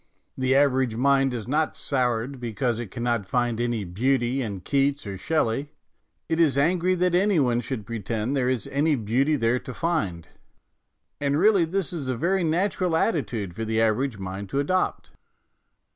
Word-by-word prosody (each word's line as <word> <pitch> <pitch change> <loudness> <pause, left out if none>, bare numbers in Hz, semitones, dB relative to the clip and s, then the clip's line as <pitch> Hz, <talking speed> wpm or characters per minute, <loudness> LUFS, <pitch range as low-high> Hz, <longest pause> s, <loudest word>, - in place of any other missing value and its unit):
The 130 0 +1
average 130 -4 +3
mind 135 +2 +3
is 115 -4 -5
not 155 +4 0
soured 125 0 -1
because 120 0 -2
it 120 -4 -5
cannot 120 -3 -2
find 120 +1 0
any 120 -3 -1
beauty 120 +7 0
in 100 -6 -4
Keats 140 +5 0
or 100 -1 -5
Shelley; 140 - -1 0.6
it 160 - -1
is 150 -5 +3
angry 175 +5 +2
that 180 0 +1
any 190 0 +3
one 120 -4 +2
should 120 -5 -5
pretend 115 +3 -3
there 125 -2 +1
is 125 -5 -1
any 145 +2 +2
beauty 130 +6 +1
there 120 -1 +1
to 130 - -8
find; 100 - -2 0.9
and 140 0 +1
really 195 0 +4
this 180 +1 -2
is 145 -6 -4
a 130 - -1
very 180 +6 +1
natural 175 +1 +1
attitude 115 - -1
for 115 - -4
the 110 0 0
average 115 +2 +1
mind 95 +1 -6
to 135 - -1
adopt. 185 +6 -1
130 Hz, 170 wpm, -25 LUFS, 115-155 Hz, 0.9 s, really